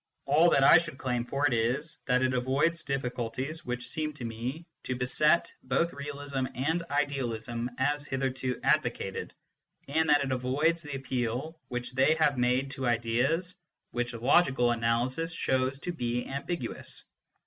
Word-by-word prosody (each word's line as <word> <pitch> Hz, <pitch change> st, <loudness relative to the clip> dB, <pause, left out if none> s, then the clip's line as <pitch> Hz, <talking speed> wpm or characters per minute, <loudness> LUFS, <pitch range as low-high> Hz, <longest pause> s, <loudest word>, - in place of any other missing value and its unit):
All 155 Hz, +5 st, +5 dB
that 140 Hz, -, +4 dB
I 160 Hz, -, +9 dB
should 165 Hz, -4 st, -6 dB
claim 125 Hz, -2 st, -1 dB
for 140 Hz, +3 st, 0 dB
it 140 Hz, -, +3 dB
is, 125 Hz, +8 st, -1 dB
that 125 Hz, 0 st, +3 dB
it 130 Hz, 0 st, +2 dB
avoids 135 Hz, +7 st, +1 dB
difficulties 130 Hz, +2 st, -3 dB
which 125 Hz, 0 st, -4 dB
seem 155 Hz, +3 st, -3 dB
to 130 Hz, -5 st, -7 dB
me 120 Hz, +8 st, -4 dB, 0.2 s
to 125 Hz, -, -1 dB
beset 150 Hz, +6 st, +2 dB
both 170 Hz, +1 st, 0 dB
realism 140 Hz, -2 st, -4 dB
and 155 Hz, +7 st, 0 dB
idealism 125 Hz, -5 st, -1 dB
as 145 Hz, +2 st, +1 dB
hitherto 130 Hz, -2 st, -2 dB
advocated, -, -, 0 dB, 0.6 s
and 160 Hz, +3 st, +1 dB
that 145 Hz, -1 st, +5 dB
it 135 Hz, -, -2 dB
avoids 140 Hz, +7 st, +1 dB
the 145 Hz, -3 st, -6 dB
appeal 130 Hz, +4 st, -3 dB
which 125 Hz, 0 st, -4 dB
they 135 Hz, +4 st, +3 dB
have 155 Hz, -3 st, +3 dB
made 125 Hz, +2 st, +2 dB
to 130 Hz, -2 st, -3 dB
ideas 120 Hz, +10 st, +1 dB, 0.4 s
which 120 Hz, 0 st, -2 dB
logical 125 Hz, 0 st, +3 dB
analysis 120 Hz, +7 st, 0 dB
shows 130 Hz, -3 st, 0 dB
to 175 Hz, -, -3 dB
be 120 Hz, -6 st, -2 dB
ambiguous. 140 Hz, -1 st, -5 dB
135 Hz, 150 wpm, -29 LUFS, 125-150 Hz, 0.6 s, I